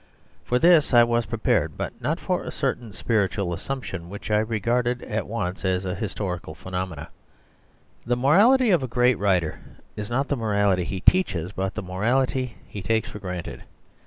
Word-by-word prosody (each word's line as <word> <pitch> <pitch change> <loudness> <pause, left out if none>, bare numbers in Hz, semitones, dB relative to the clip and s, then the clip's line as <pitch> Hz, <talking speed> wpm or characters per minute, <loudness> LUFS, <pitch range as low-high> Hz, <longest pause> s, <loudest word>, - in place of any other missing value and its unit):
For 125 - +1
this 165 -3 +5
I 120 - +9
was 120 0 +1
prepared; 115 -2 0
but - - -3
not - - -1
for - - -1
a - - -5
certain 115 -3 -2
spiritual 100 -3 0
assumption 95 -4 -5
which 100 +2 -7
I 105 - +4
recognised 120 +3 0
at 110 0 -3
once 95 -5 -3
as 95 0 0
a 90 - -2
historical 90 -7 -4
phe 90 +4 -11
nomenon.. 90 -5 -3 1.0
The 120 0 +1
morality 210 - +5
of 175 -5 +4
a 130 - -2
great 125 0 +2
writer 95 -5 +1 0.4
is 105 -1 -5
not 135 +4 0
the 145 - 0
morality 100 -5 +1
he 95 0 -4
teaches, 95 - +2
but 95 +1 -3
the 110 - -4
morality 125 +6 0
he 100 - -7
takes 110 +3 0
for 105 - -8
granted. 90 -3 -6
105 Hz, 175 wpm, -24 LUFS, 95-125 Hz, 1.0 s, I